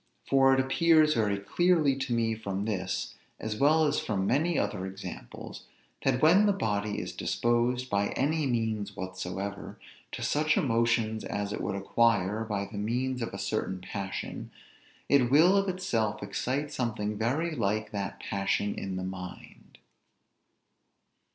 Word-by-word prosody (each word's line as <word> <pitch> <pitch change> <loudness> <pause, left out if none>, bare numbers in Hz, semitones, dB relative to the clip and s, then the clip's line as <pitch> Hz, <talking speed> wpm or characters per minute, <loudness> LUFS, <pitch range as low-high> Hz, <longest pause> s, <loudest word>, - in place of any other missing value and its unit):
For 135 -1 +5
it 135 - +4
appears 155 +3 +4
very 105 -6 +1
clearly 155 - +2
to 135 -1 -4
me 115 -1 +1
from 100 -2 -4
this, 95 -4 -2 0.3
as 110 -1 -4
well 155 +4 +4
as 150 0 +1
from 100 -3 -1
many 155 - +1
other 95 +1 -1
examples, 95 -9 -9 0.4
that 135 0 +1
when 185 +7 +6
the 205 - +4
body 105 - -1
is - - -5
disposed, 120 +2 0
by 100 -3 +1
any 150 +2 +1
means 110 -4 -1
whatsoever, 95 +1 -5 0.4
to - - -4
such 155 +1 +2
emotions 115 -3 +1
as 100 0 -3
it - - -4
would 100 - -2
acquire 105 0 +2
by 105 -3 -2
the 100 0 -7
means 125 +4 -1
of 115 - -3
a - - -6
certain 95 - -2
passion; 95 +1 -5 0.6
it 130 -4 +4
will 160 +8 +6
of 195 0 +2
itself 115 - -1
excite 135 +9 -2
something 105 -5 -2
very 145 +10 -1
like 110 -2 -1
that 100 -1 -4
passion 100 +1 -1
in 95 -1 -5
the 95 - -3
mind. 90 -1 -9
115 Hz, 150 wpm, -29 LUFS, 100-135 Hz, 0.6 s, when